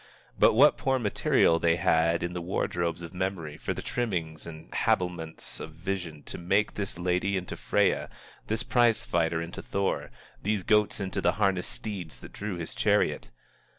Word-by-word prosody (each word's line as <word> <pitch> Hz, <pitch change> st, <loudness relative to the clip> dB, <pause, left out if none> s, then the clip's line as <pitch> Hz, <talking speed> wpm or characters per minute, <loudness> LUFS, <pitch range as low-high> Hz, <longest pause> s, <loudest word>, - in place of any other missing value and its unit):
But -, -, +6 dB
what -, -, +6 dB
poor 135 Hz, -1 st, +2 dB
material 105 Hz, -7 st, +3 dB
they 85 Hz, 0 st, +3 dB
had 85 Hz, 0 st, +2 dB
in 85 Hz, 0 st, -2 dB
the 90 Hz, -, -3 dB
wardrobes 85 Hz, -1 st, -1 dB
of 85 Hz, -, -8 dB
memory 90 Hz, -5 st, -3 dB
for -, -, -4 dB
the -, -, -4 dB
trimmings 85 Hz, -10 st, -2 dB
and 80 Hz, -1 st, -10 dB
habiliments 90 Hz, -3 st, -1 dB
of 80 Hz, -, -7 dB
vision, 85 Hz, -3 st, -4 dB
to -, -, -6 dB
make 100 Hz, +4 st, +1 dB
this 100 Hz, -3 st, -4 dB
lady 90 Hz, +3 st, 0 dB
into 90 Hz, -1 st, -4 dB
Freya, -, -, +1 dB, 0.4 s
this 110 Hz, 0 st, -1 dB
prize 120 Hz, -3 st, +3 dB
fighter 80 Hz, -1 st, +1 dB
into 85 Hz, -, -7 dB
Thor, 100 Hz, 0 st, -1 dB, 0.3 s
these 105 Hz, -2 st, 0 dB
goats 105 Hz, +1 st, +3 dB
into 95 Hz, -2 st, -2 dB
the 85 Hz, -, +3 dB
harnessed 95 Hz, -3 st, +1 dB
steeds 90 Hz, -, -5 dB
that -, -, -11 dB
drew 100 Hz, -2 st, -4 dB
his 85 Hz, -2 st, -5 dB
chariot! -, -, +1 dB
90 Hz, 170 wpm, -28 LUFS, 85-100 Hz, 0.4 s, But